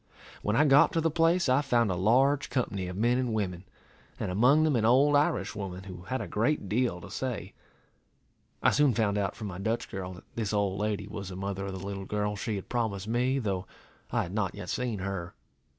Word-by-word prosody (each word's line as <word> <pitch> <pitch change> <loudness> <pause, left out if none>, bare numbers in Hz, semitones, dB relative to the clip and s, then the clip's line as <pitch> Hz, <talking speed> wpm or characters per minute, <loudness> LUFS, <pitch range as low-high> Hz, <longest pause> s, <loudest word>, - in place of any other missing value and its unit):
When 105 - 0
I 150 - +5
got 140 0 +6
to 165 - +2
the 165 0 +1
place, 165 +2 +3
I 130 +2 +4
found 120 -7 +2
a - - 0
large 135 +9 +3
company 100 -8 -1
of 90 +1 -6
men 120 +4 +2
and 125 -4 -1
women, 95 -3 -2 0.5
and - - -2
among 125 +11 +5
them 155 -3 +2
an 115 - +1
old 135 +6 +5
Irish 125 -9 +1
woman, 95 -2 -6
who 90 -3 -9
had 130 +6 -2
a - - -4
great 115 +1 0
deal 115 -3 0
to - - -10
say. 110 -7 -4 1.1
I - - +6
soon 145 -5 +3
found 105 -3 +1
out 100 -2 -1
from 110 - -7
my 95 -2 -6
Dutch 110 +4 -2
girl, 95 -1 -5
that 90 - -12
this 110 -3 -2
old 100 -2 0
lady 105 -1 -1
was 100 -2 -6
the 90 - -7
mother 100 +1 -3
of 95 - -5
the 95 0 -6
little 100 -1 -5
girl 105 +1 -1
she 110 +1 -3
had 95 - -6
promised 110 -5 -2
me, 125 +4 +1
though 100 -6 -2 0.4
I - - +1
had 90 - -7
not 100 -4 -1
yet 90 - -7
seen 125 -4 -1
her. 95 -2 -4
105 Hz, 225 wpm, -29 LUFS, 95-125 Hz, 1.1 s, got